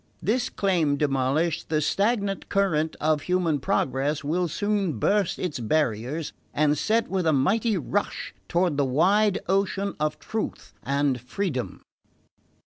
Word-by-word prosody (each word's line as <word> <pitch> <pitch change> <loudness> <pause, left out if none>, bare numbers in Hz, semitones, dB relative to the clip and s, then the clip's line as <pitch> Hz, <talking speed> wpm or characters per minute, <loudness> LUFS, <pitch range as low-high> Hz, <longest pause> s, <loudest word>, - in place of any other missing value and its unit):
This 245 +4 0
claim 170 -8 +1
demolished, 140 +3 0
the 155 -1 +2
stagnant 200 - 0
current 160 -6 +1
of 155 -1 +1
human 180 -5 +1
progress 135 +3 0
will 175 +5 0
soon 195 - -1
burst 200 - +1
its 175 -8 -3
barriers 130 +3 -1 0.2
and 150 0 +3
set 225 +9 +1
with 185 -3 -1
a 160 - +4
mighty 205 - +2
rush 205 +3 -2 0.2
toward 175 -4 +1
the 145 - +3
wide 190 +10 +3
ocean 195 +1 0
of 150 0 -1
truth 220 -1 -5
and 140 -2 0
freedom..." 130 -1 -3
165 Hz, 135 wpm, -25 LUFS, 145-195 Hz, 0.2 s, a